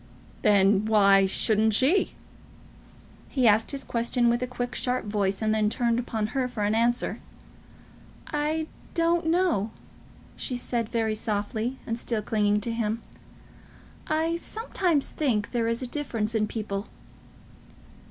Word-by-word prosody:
"Then 200 0 +4
why 200 -3 +5
shouldn't 215 +2 +2
she?" 290 - +2 1.1
He 255 -4 +2
asked 220 +1 +4
his 275 -1 -2
question 235 0 +1
with 240 +1 +1
a 250 - -1
quick, 245 0 -4
sharp 250 -2 -1
voice, 205 -1 -1
and 215 0 +2
then 215 -1 +2
turned 235 +1 +1
upon 225 -3 -2
her 265 -2 0
for 230 -4 -4
an 205 +1 +1
answer. 235 +2 +1 1.1
"I 305 +1 -1 0.3
don't 335 -1 +2
know," 325 - +2 0.7
she 255 - -2
said, 240 -2 -2
very 225 -2 0
softly, 215 +3 -2
and 230 +1 -3
still 225 -3 -2
clinging 210 -1 +1
to 230 - -2
him. 230 0 -2 1.0
"I 320 +2 0
sometimes 355 - -1
think 230 -9 -1
there 235 -2 0
is 230 +2 -1
a - - -3
difference 230 -6 -2
in 215 -1 +1
people." 210 -2 -4
230 Hz, 140 wpm, -26 LUFS, 210-255 Hz, 1.1 s, why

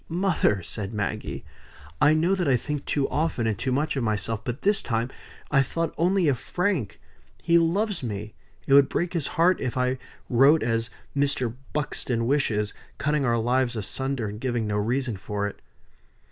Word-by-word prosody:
"Mother!" 165 - +1
said 100 +4 -5
Maggie, 100 -4 -3 0.6
"I 150 +1 +6
know 170 +4 +2
that 180 -4 0
I 130 -2 +4
think 145 +3 -4
too 140 -2 0
often 150 -6 0
and 110 -2 +1
too 130 +6 -2
much 145 +4 0
of 135 - -1
myself. 110 0 -1
But 120 +3 -5
this 205 0 +3
time 115 +1 -1 0.4
I 140 -2 +5
thought 165 +5 -2
only 180 0 +2
of 130 -5 +2
Frank. 175 - -1 0.4
He 170 0 +5
loves 190 +3 +1
me; 105 -3 -5 0.3
it 135 - +2
would 140 0 +7
break 175 +1 -1
his 165 -6 -1
heart 175 +2 +4
if 130 -1 -2
I 125 0 +1 0.3
wrote 135 +6 +5
as 115 0 0 0.3
Mr. 140 -4 +1 0.2
Buxton 125 -5 -1
wishes, 110 -6 +1 0.2
cutting 150 -1 +1
our 120 -1 +2
lives 120 +1 +1
asunder, 115 +4 -2
and 105 +2 -7
giving 120 -3 -1
no 105 -1 -1
reason 120 +1 0
for 100 +1 -3
it." 105 - -9
130 Hz, 175 wpm, -26 LUFS, 115-155 Hz, 0.6 s, would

